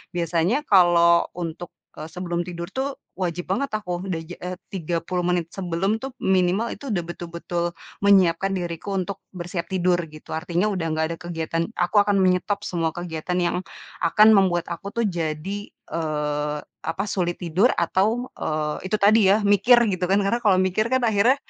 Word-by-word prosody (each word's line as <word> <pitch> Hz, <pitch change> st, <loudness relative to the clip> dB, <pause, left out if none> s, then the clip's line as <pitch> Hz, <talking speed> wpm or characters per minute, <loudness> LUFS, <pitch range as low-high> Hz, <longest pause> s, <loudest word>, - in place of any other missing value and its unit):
biasanya 175 Hz, -, +1 dB
kalau, 170 Hz, -, +5 dB
untuk, 175 Hz, 0 st, -5 dB, 0.3 s
eee, 155 Hz, -, -6 dB
sebelum 175 Hz, 0 st, -3 dB
tidur 170 Hz, -1 st, -6 dB
tuh, 270 Hz, +1 st, -2 dB, 0.2 s
wajib 175 Hz, 0 st, -2 dB
banget 275 Hz, +8 st, 0 dB
aku, 180 Hz, -3 st, -4 dB
udah 170 Hz, -4 st, -2 dB
ja 175 Hz, +2 st, -9 dB
eh 180 Hz, +1 st, -5 dB, 0.2 s
30 175 Hz, 0 st, -2 dB
menit 175 Hz, -2 st, 0 dB
sebelum 195 Hz, +3 st, -1 dB
tuh, 265 Hz, +1 st, -7 dB
minimal 190 Hz, +4 st, +2 dB
itu, 280 Hz, -, -8 dB
udah 175 Hz, -4 st, 0 dB
betul-betul 170 Hz, 0 st, -4 dB, 0.4 s
menyiapkan 195 Hz, -2 st, +4 dB
diriku, 175 Hz, +2 st, -4 dB
untuk 190 Hz, +1 st, -3 dB, 0.2 s
bersiap 175 Hz, -1 st, -4 dB
tidur, 180 Hz, -1 st, +1 dB
gitu. 155 Hz, 0 st, -13 dB
Artinya, 175 Hz, +5 st, 0 dB
udah 180 Hz, -4 st, -2 dB
nggak 160 Hz, 0 st, +1 dB
ada -, -, -20 dB
kegiatan 165 Hz, -1 st, -3 dB
aku 180 Hz, +4 st, +2 dB
akan 205 Hz, 0 st, +1 dB
menyetop 185 Hz, +2 st, +1 dB
semua 170 Hz, -5 st, -1 dB
kegiatan, 175 Hz, 0 st, -4 dB
yang 175 Hz, 0 st, +1 dB, 0.5 s
akan 210 Hz, +6 st, +6 dB
membuat 185 Hz, -5 st, +3 dB
aku 170 Hz, +3 st, -6 dB
tuh, 235 Hz, -, +1 dB
jadi, 175 Hz, +3 st, -3 dB
eee, 150 Hz, -2 st, -3 dB, 0.2 s
apa, 170 Hz, +4 st, -3 dB
sulit 175 Hz, -2 st, 0 dB
tidur 180 Hz, +8 st, +3 dB
atau, 215 Hz, +8 st, 0 dB
eee, 155 Hz, +3 st, -2 dB
itu 205 Hz, -, 0 dB
tadi 210 Hz, 0 st, +5 dB
ya, 210 Hz, +1 st, +3 dB
mikir, 205 Hz, +4 st, +5 dB, 0.2 s
gitu 185 Hz, -1 st, -1 dB
kan. 195 Hz, -, +3 dB
Karena, 230 Hz, +5 st, +1 dB
kalau 200 Hz, -3 st, +5 dB
mikir 190 Hz, +4 st, +1 dB
kan, 260 Hz, -1 st, +2 dB
akhirnya, 225 Hz, +3 st, +4 dB
180 Hz, 170 wpm, -23 LUFS, 170-200 Hz, 0.5 s, akan